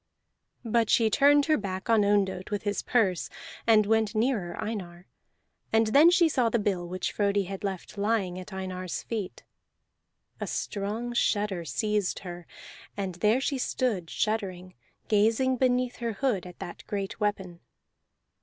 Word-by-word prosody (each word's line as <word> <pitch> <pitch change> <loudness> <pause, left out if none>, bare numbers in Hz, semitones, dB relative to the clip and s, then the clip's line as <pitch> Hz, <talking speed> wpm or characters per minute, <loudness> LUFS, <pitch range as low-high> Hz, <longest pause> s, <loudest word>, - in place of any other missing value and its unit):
But 230 -1 +2
she 225 -2 +4
turned 285 +4 +5
her 310 -1 +3
back 190 -1 -5
on 225 -3 +4
Ondott 200 -2 +1
with 205 -1 -3
his 205 -2 -1
purse, 200 -8 +1 0.4
and 215 -2 +6
went 220 0 +1
nearer 215 -7 0
Einar; 180 -5 -5 0.7
and 225 0 +4
then 305 +4 +8
she 345 -1 +5
saw 255 -7 +2
the 235 - +1
bill 195 -5 -1
which 185 +1 -2
Frodi 200 -1 +1
had 195 +1 -7
left 195 +1 -5
lying 200 -4 0
at 185 - -10
Einar's 185 -1 -4
feet. 215 -5 -5 1.0
A - - -3
strong 215 +4 -3
shudder 205 -6 0
seized 210 +1 -1
her, 175 -1 -8 0.5
and 195 -2 -2
there 220 +4 +4
she 275 0 -1
stood 215 -10 -1
shuddering, 185 -4 -2 0.3
gazing 225 +5 +3
beneath 250 -1 +1
her 235 -2 -2
hood 205 -6 -1
at 180 - -12
that 175 - -8
great 200 -1 -4
weapon. 190 -5 -2
210 Hz, 150 wpm, -28 LUFS, 190-230 Hz, 1.0 s, then